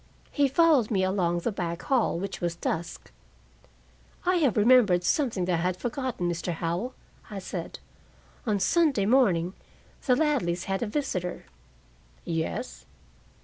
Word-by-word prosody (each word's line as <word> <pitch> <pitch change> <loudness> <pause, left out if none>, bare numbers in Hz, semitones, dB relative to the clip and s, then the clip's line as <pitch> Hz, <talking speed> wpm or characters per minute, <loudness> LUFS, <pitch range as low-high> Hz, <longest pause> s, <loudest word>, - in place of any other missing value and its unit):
He 285 -2 +3
followed 285 -5 +4
me 195 -4 +1
along 180 -2 0
the 235 - -1
back 175 -3 -4
hall, 255 -10 +1
which 195 +2 -5
was 170 -1 -1
dusk. 170 0 -4 1.1
"I 365 0 +3
have 280 - +2
remembered 210 -5 +5
something 230 - +1
that 175 -2 +1
I - - -2
had 180 +1 0
forgotten, 245 -6 -3
Mr. 175 0 -2
Howell," 170 +10 -3 0.3
I 205 - -6
said. 185 -3 -6 0.7
"On 210 -2 +1
Sunday 270 - +2
morning, 195 -8 +3 0.5
the 250 - +5
Ladleys 250 - 0
had 195 0 -2
a 235 - -1
visitor." 190 - -3 0.8
"Yes?" 65 - -4
195 Hz, 140 wpm, -27 LUFS, 175-255 Hz, 1.1 s, remembered